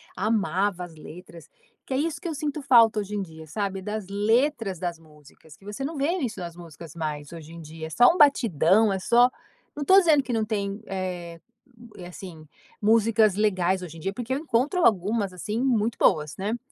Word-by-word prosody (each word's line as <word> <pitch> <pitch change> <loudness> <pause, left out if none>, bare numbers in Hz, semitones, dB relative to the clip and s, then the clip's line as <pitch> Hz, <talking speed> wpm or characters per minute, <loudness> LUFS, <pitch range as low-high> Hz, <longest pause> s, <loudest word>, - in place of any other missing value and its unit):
amava 200 -3 0
as 170 -2 -10
letras, 165 0 -12 0.4
que 265 - -5
é - - 0
isso 315 +2 -2
que 370 - -6
eu 325 - -3
sinto 300 0 -3
falta 230 -5 +5
hoje 205 0 -5
em 205 - -1
dia, 160 -3 -9
sabe, 195 +3 -4
das 210 0 -5
letras 220 - 0
das 175 -2 -3
músicas, 150 -1 -19
que - - -25
você 210 +6 -6
não 320 +2 -5
vê 285 +5 0
isso 240 -7 -4
nas 170 -1 -7
músicas 165 -2 -12
mais 150 -2 -5
hoje 165 -1 -10
em 170 - -10
dia, 160 +1 -8
é - - -10
só 245 - +5
um 360 - -4
batidão, 220 - +4
é 190 - -1
só 240 +6 +4 0.5
não 290 -1 -4
tô 380 +4 +6
dizendo 310 -6 +3
que 250 - -4
não 220 -1 +1
tem, 205 -1 -3
eh, 180 -3 -5 0.7
assim, 175 -3 -11 0.4
músicas 220 -1 +3
legais 190 -3 +1
hoje 165 -1 -9
em - - -11
dia, 195 +5 -3
porque 245 +3 -4
eu 270 - -1
encontro 300 +5 0
algumas 205 0 +2
assim 210 +6 -4
muito 235 -3 +1
boas, 150 -1 +2
né. 210 +5 -2
200 Hz, 200 wpm, -25 LUFS, 170-235 Hz, 0.7 s, tô